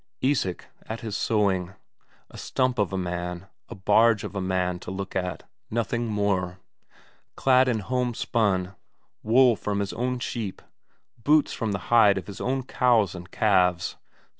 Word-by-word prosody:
Isak 130 -10 0 0.2
at 115 +1 -5
his 110 -4 -4
sowing; 95 -4 0 0.6
a - - -14
stump 130 -2 0
of 100 -2 +1
a 95 - -2
man, 90 0 -4 0.2
a 120 - -7
barge 105 +2 +3
of 105 - -6
a 100 - -1
man 90 -1 -1
to - - -9
look 95 +1 -5
at, 90 -3 -2 0.3
nothing 115 +1 -1
more. 100 -4 -1 0.8
Clad 130 -1 +4
in 115 -4 0
homespun 110 -5 0 0.5
wool 120 +2 +5
from 100 -1 -3
his 100 -1 -2
own 125 +2 -1
sheep, 115 -5 -5 0.6
boots 150 +3 +3
from 115 -3 -2
the 95 +3 -4
hide 105 -4 +6
of 95 - -4
his 100 - -8
own 130 +1 -1
cows 120 -6 +2
and 90 0 -9
calves. 90 -5 +2
105 Hz, 155 wpm, -26 LUFS, 95-120 Hz, 0.8 s, hide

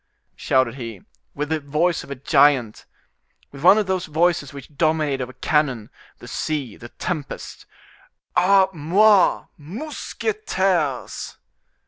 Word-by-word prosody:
shouted 130 -3 +1
he, 115 -7 -8 0.3
with 150 +1 -3
the 160 0 0
voice 150 +4 0
of - - -14
a 140 - -4
giant, 130 -3 +2 0.6
with 140 - -11
one 185 +6 +7
of 215 - +1
those 185 -1 -2
voices 160 -2 +1
which 140 +1 -12
dominate 155 -3 +1
over 130 0 -5
cannon, 135 -6 0 0.3
the - - -13
sea, 140 -8 -3
the 120 - -11
tempest. 155 -1 -6 0.7
"A 190 +2 +5
moi! 190 +5 +4 0.2
mousquetaires!" 190 - -3
150 Hz, 120 wpm, -22 LUFS, 135-180 Hz, 0.7 s, one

